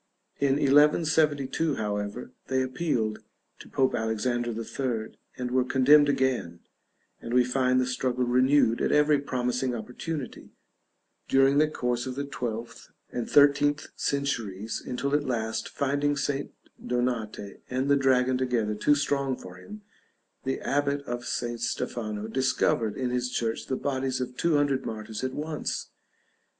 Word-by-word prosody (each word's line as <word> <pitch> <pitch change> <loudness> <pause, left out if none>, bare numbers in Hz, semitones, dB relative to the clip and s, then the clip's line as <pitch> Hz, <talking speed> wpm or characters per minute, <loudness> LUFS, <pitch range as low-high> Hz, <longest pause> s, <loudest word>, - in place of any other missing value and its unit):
In 140 -1 +3
1172, 150 +1 +3
however, 105 +2 -3 0.2
they 130 0 +1
appealed 125 -5 -1 0.4
to - - -12
Pope 130 -1 +1
Alexander 120 +1 -1
III, 115 0 -3 0.2
and 125 -1 -3
were 130 0 +3
condemned 145 +3 +5
again: 125 -12 0 0.6
and 120 - -3
we 125 - +6
find 130 0 +2
the 130 - +2
struggle 125 0 -1
renewed 125 -1 +3
at - - +1
every 150 0 +4
promising 125 -2 -1
opportunity, 125 +6 -6 0.7
during 135 +1 +4
the 155 - +5
course 125 -4 -2
of 130 - -4
the 140 - -2
12th 120 -4 -5 0.2
and 120 - -3
13th 145 +1 +4
centuries; 115 -7 -2
until 140 +3 -3
at 145 0 +2
last, 110 -3 -2
finding 145 +1 0
St. 140 0 -2 0.3
Donate 120 -5 -2
and 130 +2 -1
the 140 - +5
dragon 130 -2 +3
together 120 -5 0
too 145 +8 +3
strong 140 -2 0
for 90 0 -11
him, 210 - -11 0.6
the 135 - -1
abbot 140 0 0
of 120 -2 -5
St. 120 -1 -3
Stefano 110 -3 -3
"discovered" 125 -3 +1
in 125 -2 -1
his 125 0 -1
church 115 -2 -2
the 130 - -1
bodies 130 -1 -2
of 125 0 -4
two 170 +2 +1
hundred 140 -2 +2
martyrs 110 +1 -5
at 130 0 -2
once! 155 0 -4
130 Hz, 140 wpm, -27 LUFS, 120-140 Hz, 0.7 s, we